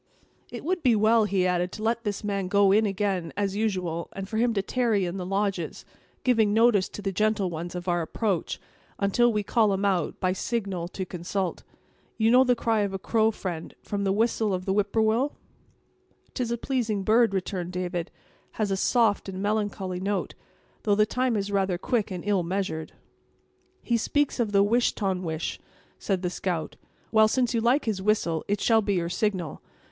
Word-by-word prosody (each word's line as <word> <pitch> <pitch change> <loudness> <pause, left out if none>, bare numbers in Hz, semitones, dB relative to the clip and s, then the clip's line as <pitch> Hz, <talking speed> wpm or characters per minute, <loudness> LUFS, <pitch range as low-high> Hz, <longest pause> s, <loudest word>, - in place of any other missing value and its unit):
"It - - -7
would 360 +1 0
be 250 -5 +4
well," 220 +1 +4
he 195 -3 +1
added, 180 0 0
"to 215 - -6
let 230 +1 0
this 205 0 -2
man 200 -2 -1
go 200 0 +4
in 215 +2 +4
again, 195 -4 -1
as 200 -1 -1
usual, 185 -6 -2
and 195 0 -6
for 220 - -4
him 235 +1 +3
to 195 - +1
tarry 225 -5 +1
in 175 +2 -4
the 180 -1 -4
lodges, 195 -4 -2 0.4
giving 220 -5 +3
notice 225 -4 +4
to 205 - -8
the 195 - -1
gentle 210 -1 +1
ones 170 +2 -5
of 180 0 -6
our 175 -1 +1
approach, 185 +2 -2 0.4
until 235 +5 +3
we 210 -2 0
call 215 0 +2
him 195 +1 0
out, 190 -3 0
by 185 -1 +1
signal, 195 -4 -2
to 190 +1 -5
consult. 180 +1 -3 0.6
You 225 0 +3
know 255 +2 +7
the 250 -1 +3
cry 225 -1 +1
of 200 -2 0
a - - -1
crow, 220 +3 +2
friend, 175 -6 -5
from 200 -1 -3
the 195 - +1
whistle 220 -1 +1
of 185 0 -5
the 190 - +1
whip 205 0 +1
poor 220 - +2
will?" 235 +6 +1 1.0
"'Tis 250 -3 -2
a 235 - -1
pleasing 230 -6 -1
bird," 225 +2 +4
returned 185 -2 -3
David, 180 -2 -3
"and - - -34
has 210 -3 -1
a 195 - +1
soft 220 -2 +2
and 190 -1 -6
melancholy 205 -3 -1
note! 200 +1 -2 0.5
though 205 -2 +2
the 210 +1 +4
time 250 +1 0
is 200 0 -2
rather 195 -2 +1
quick 220 +3 -1
and 180 -3 -5
ill 205 -3 +2
measured." 170 -3 -3 0.9
"He 235 - +1
speaks 290 +4 0
of 225 -3 +1
the 200 -1 +5
wish 235 +4 +2
ton 190 -3 -1
wish," 160 -2 -3 0.4
said 190 -2 -1
the 180 - -1
scout; 175 -3 -3 0.4
"well, 220 -1 +6
since 250 +2 +1
you 230 - +1
like 250 +5 +2
his 210 -4 -1
whistle, 190 -6 +1
it 205 0 0
shall 225 0 +4
be 200 -1 0
your 170 -2 0
signal. 185 - -2
200 Hz, 200 wpm, -26 LUFS, 185-220 Hz, 1.0 s, know